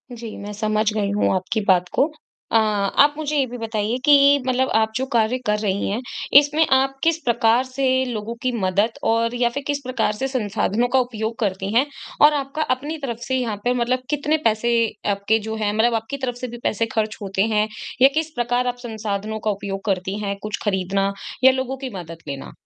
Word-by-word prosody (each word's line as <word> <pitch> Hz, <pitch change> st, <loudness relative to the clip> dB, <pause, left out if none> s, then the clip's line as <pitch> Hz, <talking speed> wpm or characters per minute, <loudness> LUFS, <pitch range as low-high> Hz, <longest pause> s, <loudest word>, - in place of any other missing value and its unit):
जी, 230 Hz, -2 st, -7 dB
मैं 205 Hz, +1 st, -7 dB
समझ 215 Hz, +1 st, 0 dB
गई 205 Hz, -2 st, 0 dB
हूँ 205 Hz, -1 st, +1 dB
आपकी 190 Hz, +4 st, -1 dB
बात 180 Hz, -2 st, +4 dB
को। 275 Hz, -, +4 dB, 0.5 s
अ -, -, +6 dB, 0.5 s
आप 290 Hz, 0 st, +3 dB
मुझे 305 Hz, -1 st, -2 dB
ये 275 Hz, -, +3 dB
भी 245 Hz, +1 st, -7 dB
बताइए 225 Hz, 0 st, -2 dB
कि 295 Hz, -, +7 dB, 0.3 s
मतलब 260 Hz, +1 st, +1 dB
आप 220 Hz, 0 st, +3 dB
जो 260 Hz, -, 0 dB
कार्य 230 Hz, +1 st, +2 dB
कर 210 Hz, 0 st, +1 dB
रही 200 Hz, -2 st, -1 dB
हैं, 210 Hz, +5 st, -2 dB, 0.4 s
इसमें 300 Hz, +2 st, +2 dB
आप 270 Hz, +1 st, 0 dB
किस 330 Hz, -1 st, +3 dB
प्रकार 235 Hz, 0 st, +3 dB
से 260 Hz, +1 st, -4 dB, 0.2 s
लोगों 230 Hz, -2 st, -4 dB
की 255 Hz, -, 0 dB
मदद 205 Hz, +2 st, 0 dB
और 230 Hz, +1 st, +1 dB
या 240 Hz, -1 st, +2 dB
फिर 280 Hz, +4 st, -5 dB
किस 285 Hz, -1 st, 0 dB
प्रकार 255 Hz, -4 st, 0 dB
से 265 Hz, +6 st, -2 dB
संसाधनों 230 Hz, -2 st, 0 dB
का 265 Hz, -, +5 dB
उपयोग 230 Hz, -2 st, -3 dB
करती 195 Hz, -3 st, -1 dB
हैं? 250 Hz, +4 st, +4 dB, 0.4 s
और 295 Hz, +1 st, +8 dB
आपका 280 Hz, +1 st, -3 dB
अपनी 295 Hz, +5 st, -6 dB
तरफ़ 250 Hz, -6 st, -5 dB
से 260 Hz, -, 0 dB
यहाँ 235 Hz, -4 st, -1 dB
पे 245 Hz, -, +2 dB
मतलब 250 Hz, +1 st, 0 dB
कितने 295 Hz, +1 st, +1 dB
पैसे 225 Hz, +2 st, +2 dB, 0.4 s
आपके 200 Hz, +2 st, +1 dB
जो 220 Hz, -, -3 dB
हैं 215 Hz, -2 st, 0 dB
मतलब 225 Hz, +3 st, +2 dB
आपकी 225 Hz, +5 st, -3 dB
तरफ़ 255 Hz, -3 st, -3 dB
से 255 Hz, -, -4 dB
भी 240 Hz, 0 st, -8 dB
पैसे 230 Hz, +2 st, 0 dB
ख़र्च 220 Hz, 0 st, -1 dB
होते 195 Hz, -1 st, -2 dB
हैं? 210 Hz, 0 st, +2 dB, 0.3 s
या 265 Hz, -, +9 dB
किस 320 Hz, 0 st, 0 dB
प्रकार 245 Hz, +1 st, 0 dB
आप 245 Hz, -, -1 dB
संसाधनों 220 Hz, -2 st, -4 dB
का 215 Hz, -, +3 dB
उपयोग 195 Hz, -1 st, -5 dB
करती 190 Hz, -1 st, -1 dB
हैं, 200 Hz, -1 st, -2 dB
कुछ 210 Hz, -1 st, -3 dB
ख़रीदना 195 Hz, -1 st, 0 dB, 0.3 s
या 265 Hz, -, +9 dB
लोगों 260 Hz, 0 st, -3 dB
की -, -, -3 dB
मदद 165 Hz, -1 st, -9 dB
लेना? 140 Hz, -1 st, -6 dB
230 Hz, 210 wpm, -22 LUFS, 210-255 Hz, 0.5 s, या